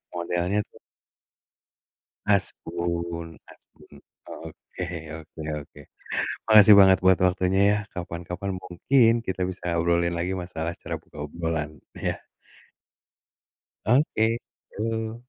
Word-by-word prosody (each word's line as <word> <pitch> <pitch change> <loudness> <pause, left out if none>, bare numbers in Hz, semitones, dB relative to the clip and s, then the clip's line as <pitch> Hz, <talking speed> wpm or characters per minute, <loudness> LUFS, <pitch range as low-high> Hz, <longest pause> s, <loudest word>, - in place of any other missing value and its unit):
modelnya 90 +3 0
tuh. - - -18 1.5
Asbun, 85 -3 -1 0.2
asbun - - -18 0.3
oke 90 - -8 0.4
oke 80 0 -11 0.2
oke. - - -15 0.7
Makasih 105 -1 +9
banget 95 -1 +7
buat 95 0 +4
waktunya 90 +1 +2
ya, 105 - +2 0.2
kapan-kapan 90 +2 -5
mungkin 115 +7 +3
kita 95 -3 -2
bisa 90 -2 -3
obrolin 85 0 +2
lagi 90 +2 -1
masalah 85 -2 -4
cara - - -6
buka 75 - -10
obrolan 80 -3 -3 0.2
ya? - - -3 1.7
Oke, 120 -1 +3 0.5
yuk. 110 +1 -2
90 Hz, 100 wpm, -25 LUFS, 85-100 Hz, 1.7 s, Makasih